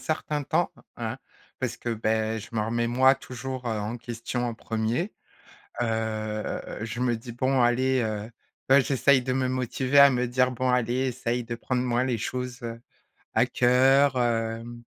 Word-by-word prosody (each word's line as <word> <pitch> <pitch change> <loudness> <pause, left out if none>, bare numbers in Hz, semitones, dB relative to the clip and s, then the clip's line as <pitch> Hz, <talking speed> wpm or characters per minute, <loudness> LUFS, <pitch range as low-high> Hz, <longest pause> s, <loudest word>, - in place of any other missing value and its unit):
certain 150 -2 -2
temps, - - 0 0.2
hein, - - -4 0.4
parce - - -2
que, 120 - -4
beh, 110 0 0
je - - -10
me 110 - 0
remets, 120 +2 0
moi, 130 +3 +5
toujours, 130 0 -7
heu, 110 -2 -1
en 105 +3 -3
question 120 +1 -4
en - - -3
1er. 115 - -2 0.7
Heu, 110 -2 -3
je 115 +2 -4
me 125 -2 +1
dis: 115 +2 -9
«Bon 130 +2 +1
allez», 125 +1 +3
heu 110 0 -3 0.4
heu, 140 +1 +8
j'essaye 135 +1 +3
de 130 +1 -2
me 130 0 0
motiver 130 +2 0
à 140 0 +9
me 125 -1 0
dire: 125 +1 +2
«Bon 125 +1 0
allez 125 +2 +1
essaye 120 -1 -2
de 115 0 -5
prendre 125 +1 -1
moins 125 0 +1
les 125 -3 -1
choses, 125 +1 -4
heu, 115 0 -6 0.5
à - - +4
cœur, 130 +2 +4
hem, 115 0 -2
120 Hz, 170 wpm, -26 LUFS, 115-130 Hz, 0.7 s, à